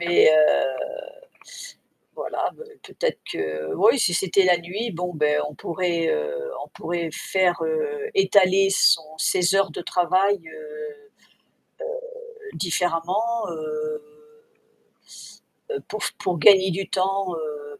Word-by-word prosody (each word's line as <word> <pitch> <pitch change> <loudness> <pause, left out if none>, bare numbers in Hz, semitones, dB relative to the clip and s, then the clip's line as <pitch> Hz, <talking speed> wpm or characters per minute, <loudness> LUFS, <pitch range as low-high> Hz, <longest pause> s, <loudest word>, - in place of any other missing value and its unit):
mais 175 -1 +5
heu, 150 -4 +3 1.3
voilà, - - -3
ben, 470 - -12 0.2
peut-être - - -3
que 80 0 -4
ou, - - +4
si 185 -8 +2
c'était 190 +2 +2
la 180 -1 +5
nuit, 195 +7 -4
bon, 180 0 -4
beh, 150 -1 +2
on 150 - -11
pourrait 170 -1 -1
heu, 485 0 -2
on - - -16
pourrait 170 -1 -4
faire, 185 0 +1
heu, 450 -2 -2
étaler 195 - +4
son 170 -4 +4 0.2
ses 180 +2 +2
heures 195 -2 +3
de 155 - -6
travail, 185 +3 +2
heu, - - -12 1.8
heu, 435 -2 -13
différemment, 185 +6 -1
heu, 460 -1 -4 1.7
heu, 430 - -2
pour 215 - -5
f - - -1
pour 180 -3 -2
gagner 190 +3 +6
du 195 +3 -4
temps, 195 0 0
heu, 150 -2 -7
185 Hz, 130 wpm, -23 LUFS, 165-230 Hz, 1.8 s, gagner